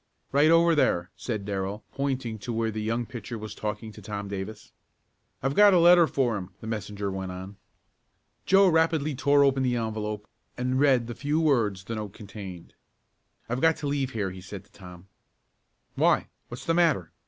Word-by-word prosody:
"Right 145 +3 +4
over 165 +1 +5
there," 90 - +1
said 110 -5 -4
Darrell, 100 +1 -3
pointing 130 -5 -2
to 120 +4 -5
where 115 -1 -1
the 110 0 -4
young 115 +2 -1
pitcher 115 -1 -7
was 110 0 -7
talking 110 +1 -5
to 105 - -13
Tom 100 0 -5
Davis. 100 +2 -6 0.7
"I've 135 +1 +1
got 205 +3 +7
a - - +6
letter 170 0 +7
for 125 -7 0
him," 90 -2 -7
the - - -10
messenger 105 -2 -4
went 95 -1 -4
on. 95 +2 -8 0.9
Joe 195 +1 +6
rapidly 160 -3 +2
tore 140 +1 +4
open 135 -1 +3
the 125 -2 +1
envelope 105 -2 -3 0.3
and 130 +1 0
read 135 -4 +4
the 120 - -6
few 145 +6 -1
words 115 -12 +1
the 115 - -6
note 105 -3 -5
contained. 100 -5 -10 0.7
"I've 120 +3 -2
got 160 -1 +4
to 145 - -4
leave 140 -2 -1
here," 100 -4 -2
he 95 0 -10
said 95 +1 -9
to - - -29
Tom. 90 -1 -13 0.9
"Why? - - +2 0.2
What's 120 - -8
the 165 - +2
matter? 155 - +2
115 Hz, 185 wpm, -27 LUFS, 100-140 Hz, 0.9 s, got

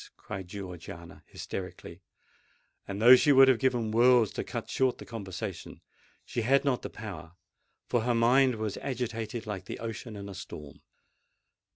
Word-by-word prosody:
cried 95 -2 -7
Georgiana 90 -3 -9
hysterically; 90 -1 -7 0.9
and 100 0 -5
though 120 +4 +9
she 145 +3 +4
would 135 -1 +8
have 130 -3 +4
given 120 -4 +1
worlds 120 -1 +5
to - - -4
cut - - -5
short 130 -1 +1
the - - -10
conversation, 95 -4 -7 0.5
she 120 - -3
had 135 +5 +3
not 130 -3 +1
the - - -6
power—for 95 +4 -7
her 120 +1 +1
mind 125 +2 +4
was 110 -2 -3
agitated 115 -3 -4
like 100 -3 -5
the - - -6
ocean 115 0 -6
in 100 -1 -7
a 100 - -7
storm. 75 -6 -10
110 Hz, 155 wpm, -29 LUFS, 95-125 Hz, 0.9 s, though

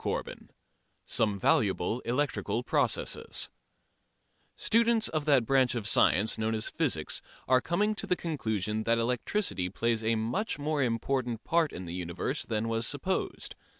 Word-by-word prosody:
CHAPTER - - -2
IV - - -14 0.6
SOME 105 -2 +1
VALUABLE 100 +3 +2
ELECTRICAL 120 -3 -1
PROCESSES - - 0 1.0
Students 230 0 +3
of 155 -2 -2
that 140 -6 +4
branch 130 0 +3
of 110 -3 -2
science 100 +1 +3
known 110 0 0
as 110 - -2
physics - - 0 0.3
are 130 0 +4
coming 205 +5 +1
to - - -5
the 180 - +2
conclusion 110 - -2
that 115 0 +3
electricity 115 - -1
plays 115 +3 -1
a 115 +1 +2
much 115 - -1
more 150 0 -1
important 120 -1 -1
part 165 -2 +2
in 90 - -7
the 85 - -6
universe 90 - -3
than 110 -1 -1
was 115 0 0
supposed. 165 +7 -2
120 Hz, 150 wpm, -29 LUFS, 110-145 Hz, 1.0 s, that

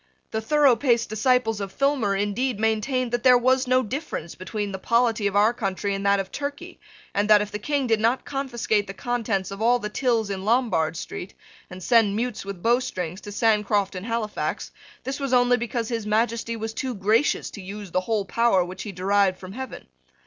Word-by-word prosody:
The 220 - -2
thoroughpaced 250 -2 +3
disciples 225 0 +1
of 195 -1 -4
Filmer, 275 -7 +1
indeed, 205 +4 -1
maintained 225 +3 0
that 240 0 0
there 250 0 +7
was 255 +1 +2
no 255 +1 +3
difference 230 - -5
whatever 185 - -11
between 205 -1 -3
the 190 - -5
polity 230 -1 +2
of 200 - -3
our 210 +3 +4
country 200 -3 -2
and 195 0 -3
that 200 0 +4
of 195 -1 -4
Turkey, 290 +5 -6 0.3
and 205 +1 0
that, 210 -1 +8
if 205 0 -3
the 210 - -4
King 285 +4 -1
did 225 -3 +2
not 230 +4 +1
confiscate 240 -7 -1
the 195 - -7
contents 225 -5 -2
of 195 +2 -7
all 240 +2 +4
the 210 -3 -5
tills 225 -3 0
in 190 -1 -4
Lombard 205 -9 +1
Street, 180 - -7 0.3
and 180 0 -9
send 215 0 +4
mutes 235 +1 -2
with 195 -3 -7
bowstrings 190 -7 0
to 205 - -8
Sancroft 210 -2 +1
and 190 +3 -6
Halifax, 230 -2 -3 0.3
this 270 +2 -4
was 275 -2 -2
only 245 0 +4
because 235 -1 -3
His 230 -3 -3
Majesty 230 +2 0
was 220 0 -5
too 255 +1 -3
gracious 215 +7 +1
to 205 - -9
use 200 0 -8
the 185 - +1
whole 210 0 -1
power 215 -4 +2
which 185 +1 -8
he 210 - -5
derived 195 0 +1
from 185 0 -10
heaven. 260 +4 -7
220 Hz, 200 wpm, -24 LUFS, 200-245 Hz, 0.3 s, that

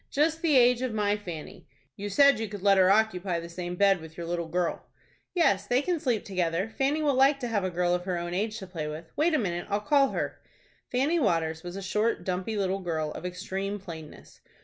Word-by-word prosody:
"Just 315 +3 +1
the 310 -5 +4
age 245 0 +5
of 255 -4 -2
my 205 -1 +2
Fanny." 175 -7 -8 0.3
"You 205 +1 -5
said 280 +5 +5
you 225 - -2
could 205 -2 -8
let 200 -1 +5
her 185 0 +5
occupy 195 -4 +2
the 170 - -7
same 175 +1 -5
bed 195 -2 +3
with 160 0 -12
your 170 - -5
little 170 0 -2
girl." 175 +1 -2 0.5
"Yes, 205 - +2
they 250 +3 +2
can 350 -1 0
sleep 245 -7 -1
together. 185 +2 -1
Fanny 290 +3 +1
will 290 -2 +3
like 270 +2 +4
to 245 - -2
have 215 -4 0
a 185 - 0
girl 175 0 0
of 180 0 -1
her 185 -2 -1
own 175 0 -4
age 215 +4 -1
to 190 - -7
play 165 -5 -5
with. 155 +2 -7
Wait 315 +2 +2
a - - +4
minute,—I'll 195 -2 -1
call 280 +2 +3
her." - - -4 0.5
Fanny 280 +7 +2
Waters 160 - 0
was 175 +1 -7
a 195 - -5
short, 210 +4 0
dumpy 185 +4 -2
little 195 -1 0
girl, 160 -4 -2
of 180 - -5
extreme 190 +2 -4
plainness. 165 -6 -11
195 Hz, 225 wpm, -28 LUFS, 175-240 Hz, 0.5 s, age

